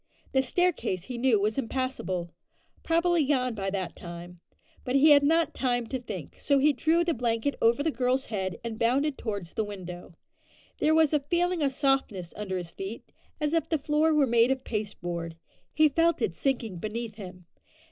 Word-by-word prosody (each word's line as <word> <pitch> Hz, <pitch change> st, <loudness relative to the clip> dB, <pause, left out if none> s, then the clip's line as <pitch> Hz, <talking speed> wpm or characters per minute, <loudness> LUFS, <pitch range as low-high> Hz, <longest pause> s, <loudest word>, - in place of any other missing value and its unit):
The 265 Hz, -, +3 dB
staircase 310 Hz, -, 0 dB
he 245 Hz, +2 st, -6 dB
knew 240 Hz, -4 st, +3 dB
was 215 Hz, +4 st, 0 dB
impassable; 225 Hz, -9 st, -3 dB, 0.5 s
probably 335 Hz, 0 st, +2 dB
gone 255 Hz, -3 st, +1 dB
by 195 Hz, -3 st, -3 dB
that 190 Hz, -3 st, -3 dB
time; 175 Hz, 0 st, -9 dB, 0.4 s
but 250 Hz, -, -2 dB
he 295 Hz, +3 st, +6 dB
had 285 Hz, -1 st, +8 dB
not 325 Hz, +3 st, +2 dB
time 245 Hz, -2 st, 0 dB
to 260 Hz, -, -2 dB
think, 190 Hz, -, -8 dB
so 280 Hz, -, +2 dB
he 290 Hz, +2 st, +4 dB
drew 320 Hz, +5 st, +2 dB
the 340 Hz, -1 st, 0 dB
blanket 235 Hz, +2 st, 0 dB
over 235 Hz, +5 st, +3 dB
the 320 Hz, -, +1 dB
girl's 255 Hz, +1 st, 0 dB
head 190 Hz, -5 st, -3 dB
and 230 Hz, -2 st, -5 dB
bounded 270 Hz, +5 st, +2 dB
towards 200 Hz, -9 st, -5 dB
the 220 Hz, -, 0 dB
window. 180 Hz, -4 st, -8 dB, 0.6 s
There 315 Hz, +1 st, +3 dB
was 320 Hz, -2 st, +4 dB
a 300 Hz, -, +4 dB
feeling 345 Hz, +4 st, 0 dB
of 280 Hz, -2 st, +2 dB
softness 265 Hz, -, 0 dB
under 195 Hz, -3 st, -3 dB
his 175 Hz, -2 st, -6 dB
feet, 195 Hz, +4 st, -7 dB, 0.3 s
as 300 Hz, 0 st, -1 dB
if 330 Hz, -, 0 dB
the 320 Hz, -, +2 dB
floor 300 Hz, +2 st, +2 dB
were 300 Hz, -2 st, +4 dB
made 235 Hz, -1 st, +4 dB
of 265 Hz, -1 st, -1 dB
pasteboard. 175 Hz, -6 st, -4 dB, 0.4 s
He 310 Hz, +1 st, +5 dB
felt 330 Hz, +3 st, +2 dB
it 185 Hz, -, 0 dB
sinking 230 Hz, -, -2 dB
beneath 215 Hz, +3 st, -5 dB
him. 180 Hz, -3 st, -10 dB
250 Hz, 185 wpm, -28 LUFS, 200-290 Hz, 0.6 s, had